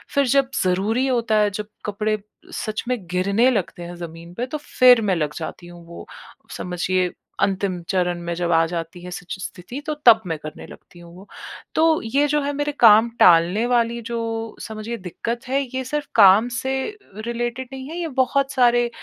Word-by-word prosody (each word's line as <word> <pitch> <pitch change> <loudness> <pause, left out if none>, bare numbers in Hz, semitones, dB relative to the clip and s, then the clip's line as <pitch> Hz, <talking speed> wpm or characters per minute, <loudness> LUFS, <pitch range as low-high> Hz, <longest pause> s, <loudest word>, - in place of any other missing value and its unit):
फिर 280 -1 +4
जब 275 +1 +3
ज़रूरी 210 +8 +1
होता 235 -4 +1
है 210 -1 +3
जब 210 +1 -5 0.2
कपड़े 215 +1 -1 0.5
सच 215 0 -3
में 250 -1 0
गिरने 200 +7 +2
लगते 180 -5 -3
हैं 175 +1 -8
ज़मीन 170 0 -9
पे 245 - -2
तो 305 - -4 0.2
फिर 250 -2 +8
मैं 195 -4 +1
लग 150 -2 -2
जाती 175 +1 -7
हूँ। 175 -1 -13
वो 170 - -10 0.5
समझिए 180 0 -1 0.3
अंतिम 190 -2 0
चरण 180 -2 0
में 170 0 -3
जब 175 0 -1
आ 165 0 +4
जाती 170 +1 -6
है 180 - -8
सिच 180 +1 -6
स्थिति 200 +9 -7
तो 305 - 0
तब 225 -2 +8
मैं 160 -2 -2
करने 155 0 -9
लगती 175 - -15
हूँ 170 0 -14
वो 195 +2 -14 0.5
तो 320 0 +3
ये 280 +6 +2
जो 295 0 +1
है 285 - -1
मेरे 290 +1 -1
काम 225 0 +7
टालने 175 +6 +5
वाली 235 -1 +1
जो 235 -1 -2 0.4
समझिए 220 +2 -6
दिक्कत 230 +6 -5
है 275 +2 +1
ये 260 - -1
सिर्फ 295 +2 -3
काम 200 +5 +7
से 265 0 -2 0.5
रिलेटेड 240 +2 -3
नहीं 265 0 -7
है। 335 - -6
ये 335 - -2
बहुत 275 +1 +1
सारे 240 -1 +3
215 Hz, 190 wpm, -22 LUFS, 180-250 Hz, 0.5 s, फिर